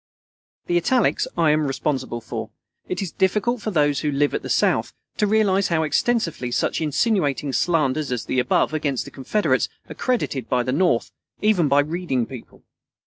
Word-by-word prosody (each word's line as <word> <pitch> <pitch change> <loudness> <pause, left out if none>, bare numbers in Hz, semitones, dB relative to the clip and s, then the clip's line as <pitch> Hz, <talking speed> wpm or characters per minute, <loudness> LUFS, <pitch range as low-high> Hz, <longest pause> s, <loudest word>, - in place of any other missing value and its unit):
The 175 - +1
italics 250 +8 +2
I 165 -3 +4
am 150 -1 +1
responsible 130 -3 -2
for. - - -6 0.4
It 185 +1 -2
is 180 - -5
difficult 210 +5 0
for 215 - -2
those 145 -6 +2
who 150 - -1
live 145 +1 +1
at - - -1
the - - -7
South - - +1 0.2
to 210 - +2
realize 200 -2 +2
how 160 -2 +1
extensively 165 - 0
such 120 - 0
insinuating 150 - 0
slanders 150 -4 +1
as 125 -2 -2
the 130 - 0
above 125 - +1
against 145 -4 -1
the - - -10
Confederates 145 +11 0 0.2
are - - -7
credited 145 - -1
at 125 -1 +2
the 130 - 0
North, 175 +6 +1 0.3
even 205 -7 +3
by 140 +1 +4
reading 150 -5 -1
people. 130 -2 -12
155 Hz, 175 wpm, -22 LUFS, 135-190 Hz, 0.4 s, I